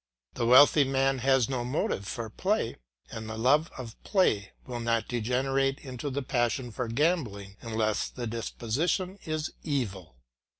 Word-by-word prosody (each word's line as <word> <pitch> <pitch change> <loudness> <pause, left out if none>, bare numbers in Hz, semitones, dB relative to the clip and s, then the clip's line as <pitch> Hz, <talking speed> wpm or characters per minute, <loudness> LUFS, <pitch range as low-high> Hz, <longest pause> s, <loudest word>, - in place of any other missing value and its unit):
The 120 -2 -1
wealthy 145 +4 +8
man 135 0 +1
has 130 -1 +3
no 130 -2 -2
motive 120 -6 -1
for 115 +2 -4
play, 185 - -1 0.3
and 110 -1 -6
the 110 - -5
love 145 +8 +3
of 120 -4 -8
play 110 - +2
will 120 -2 -5
not 115 -1 0
degenerate 135 +3 0
into 130 +1 -5
the 140 +1 -3
passion 120 0 0
for 125 +2 -3
gambling 115 - 0
unless 110 -2 -1
the 125 - -6
disposition 130 - -2
is 155 0 -2
evil. 100 - -3
125 Hz, 145 wpm, -29 LUFS, 115-140 Hz, 0.3 s, wealthy